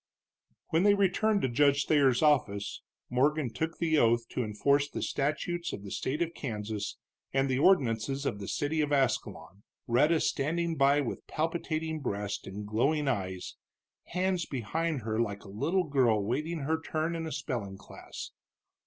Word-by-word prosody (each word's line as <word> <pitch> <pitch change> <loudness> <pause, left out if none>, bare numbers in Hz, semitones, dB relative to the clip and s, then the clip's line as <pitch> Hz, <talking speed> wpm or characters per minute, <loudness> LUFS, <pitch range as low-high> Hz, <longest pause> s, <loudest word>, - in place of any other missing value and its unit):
When 160 - +3
they 205 +1 +5
returned 200 +2 +2
to - - +3
Judge 140 +3 +3
Thayer's 140 -4 +3
office 105 -9 +1 0.3
Morgan 135 0 +1
took 160 +7 -3
the 160 -2 +2
oath 115 0 +3
to 125 - -2
enforce 140 +7 +1
the - - -4
statutes 160 +5 -1
of 100 - -6
the 100 - -8
state 150 +6 -1
of 170 0 -5
Kansas 105 -7 -4 0.4
and 135 0 +2
the 130 -1 0
ordinances 135 - +2
of 100 - -1
the 100 - -6
city 155 +2 0
of 150 -1 -1
Ascalon, 105 - -1 0.2
Rhetta 150 +7 +3
standing 165 +4 0
by 140 0 +4
with 130 - -5
palpitating 160 0 -2
breast 105 -6 -3
and 100 +2 -6
glowing 140 +8 +1
eyes, 95 -7 -3 0.5
hands 180 -1 0
behind 145 +5 -2
her 110 0 -2
like 100 -3 -3
a - - -12
little 165 - 0
girl 120 -8 +2
waiting 155 +8 -2
her 160 +3 -1
turn 160 +1 -2
in 165 -1 -3
a - - -5
spelling 120 -9 -4
class. 100 - -9
140 Hz, 160 wpm, -30 LUFS, 115-160 Hz, 0.5 s, they